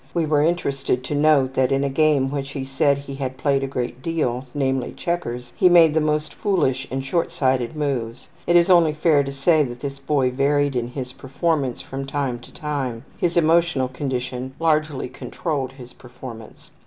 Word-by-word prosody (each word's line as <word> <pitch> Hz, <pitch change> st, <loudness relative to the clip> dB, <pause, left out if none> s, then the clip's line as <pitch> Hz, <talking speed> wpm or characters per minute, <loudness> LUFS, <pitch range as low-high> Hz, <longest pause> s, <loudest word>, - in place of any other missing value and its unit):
We 170 Hz, -2 st, +2 dB
were 150 Hz, -1 st, +2 dB
interested 140 Hz, -6 st, 0 dB
to 140 Hz, -, -4 dB
note 145 Hz, -3 st, +3 dB
that 130 Hz, 0 st, +2 dB
in 135 Hz, 0 st, +2 dB
a -, -, +1 dB
game 140 Hz, -1 st, +2 dB
which 140 Hz, -1 st, -4 dB
he 135 Hz, -2 st, -4 dB
said 135 Hz, +1 st, +2 dB
he 140 Hz, 0 st, -8 dB
had 130 Hz, -1 st, -4 dB
played 140 Hz, 0 st, +1 dB
a -, -, -1 dB
great 125 Hz, -2 st, -4 dB
deal, 135 Hz, -5 st, -1 dB
namely 135 Hz, -3 st, -1 dB
checkers, 125 Hz, -9 st, -4 dB
he 180 Hz, -, +5 dB
made 165 Hz, -3 st, +6 dB
the 160 Hz, -, +2 dB
most 150 Hz, 0 st, -1 dB
foolish 135 Hz, -, 0 dB
and 135 Hz, +1 st, -3 dB
shortsighted 135 Hz, -5 st, 0 dB
moves. 130 Hz, -6 st, -3 dB, 0.2 s
It 175 Hz, -, +3 dB
is 170 Hz, 0 st, +6 dB
only 170 Hz, -4 st, +5 dB
fair 150 Hz, -1 st, +3 dB
to 140 Hz, -, -5 dB
say 150 Hz, +4 st, +3 dB
that 120 Hz, -4 st, -3 dB
this 140 Hz, -1 st, -5 dB
boy 135 Hz, -2 st, +1 dB
varied 140 Hz, +1 st, +1 dB
in 120 Hz, -1 st, -1 dB
his 125 Hz, 0 st, -6 dB
performance 135 Hz, 0 st, -1 dB
from 135 Hz, +1 st, -6 dB
time 135 Hz, -4 st, -2 dB
to -, -, -15 dB
time; 135 Hz, -6 st, -4 dB
his 175 Hz, -1 st, 0 dB
emotional 165 Hz, -5 st, +3 dB
condition 130 Hz, -1 st, -4 dB
largely 155 Hz, -4 st, +1 dB
controlled 135 Hz, +1 st, -4 dB
his 125 Hz, -2 st, -12 dB
performance. 120 Hz, -2 st, -12 dB
140 Hz, 185 wpm, -22 LUFS, 130-155 Hz, 0.2 s, made